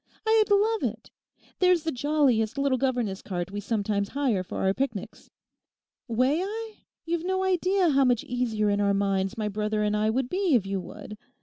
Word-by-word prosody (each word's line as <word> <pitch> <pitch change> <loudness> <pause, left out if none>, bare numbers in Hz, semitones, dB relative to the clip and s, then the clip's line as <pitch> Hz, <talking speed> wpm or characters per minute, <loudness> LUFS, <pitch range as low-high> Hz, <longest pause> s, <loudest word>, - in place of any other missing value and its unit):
I'd 440 -1 +3
love 425 +2 +2
it. - - -20 0.5
There's 360 -3 +4
the 320 - -1
jolliest 265 -5 +1
little 275 -2 +1
governess 240 -7 -1
cart 180 -1 -4
we 205 - -4
sometimes 205 -2 -1
hire 265 -9 0
for 185 - -7
our 190 0 +3
picnics. 230 -5 -4 0.8
May 255 +8 +2
I? 435 +3 -5 0.3
You've 335 0 -2
no 375 +1 0
idea 370 -1 +2
how 275 0 +4
much 245 -2 +2
easier 225 -4 0
in 205 0 +1
our 200 -1 +2
minds 195 +1 0
my 215 -1 -1
brother 210 +1 -1
and 210 0 +1
I 215 +1 +1
would 250 +3 0
be 365 -1 +1
if 215 -5 +2
you 195 0 -2
would. 210 +2 -10
245 Hz, 185 wpm, -26 LUFS, 210-335 Hz, 0.8 s, There's